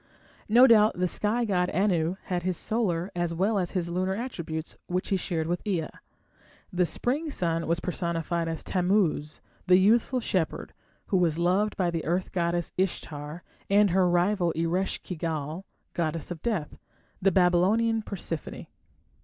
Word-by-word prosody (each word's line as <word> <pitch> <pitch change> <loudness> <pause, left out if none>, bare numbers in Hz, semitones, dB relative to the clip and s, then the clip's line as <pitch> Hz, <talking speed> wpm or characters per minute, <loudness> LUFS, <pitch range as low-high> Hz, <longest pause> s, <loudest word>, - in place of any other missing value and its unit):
No 240 +4 +8
doubt 215 -5 +5
the 180 0 +1
sky 220 +6 0
god 180 -4 +1
Anu 175 -2 +1
had 180 -1 -2
his 180 -1 -1
solar 190 -5 0
as 175 -1 -1
well 200 +4 +1
as 180 -2 -3
his 170 -1 -2
lunar 185 +2 0
attributes, 170 -9 -5
which 180 +1 -2
he 195 - +2
shared 170 -3 -2
with 175 +2 -2
Ea. 180 -7 -1 0.8
The 180 -1 +2
spring 290 - -1
sun 165 - -1
was 170 0 +1
personified 170 -1 -2
as 165 -1 -4
Tammuz, 180 -5 0 0.3
the 180 0 +7
youthful 230 +6 +3
shepherd, 185 -8 -2 0.3
who 195 - +1
was 165 -3 +2
loved 185 +5 +1
by 180 -3 +1
the 165 -1 -3
earth 180 +3 -1
goddess 170 -1 -1
Ishtar 160 -3 -3 0.3
and 200 -1 +4
her 185 0 +3
rival 175 0 +2
Eresh 170 +4 -1
ki 180 - -5
gal, 160 +2 -4 0.3
goddess 165 -1 -2
of 165 -3 -6
death, 200 -11 -3 0.4
the 195 +1 +4
Babylonian 190 +6 +3
Persephone. 175 -7 -5
180 Hz, 155 wpm, -27 LUFS, 170-200 Hz, 0.8 s, No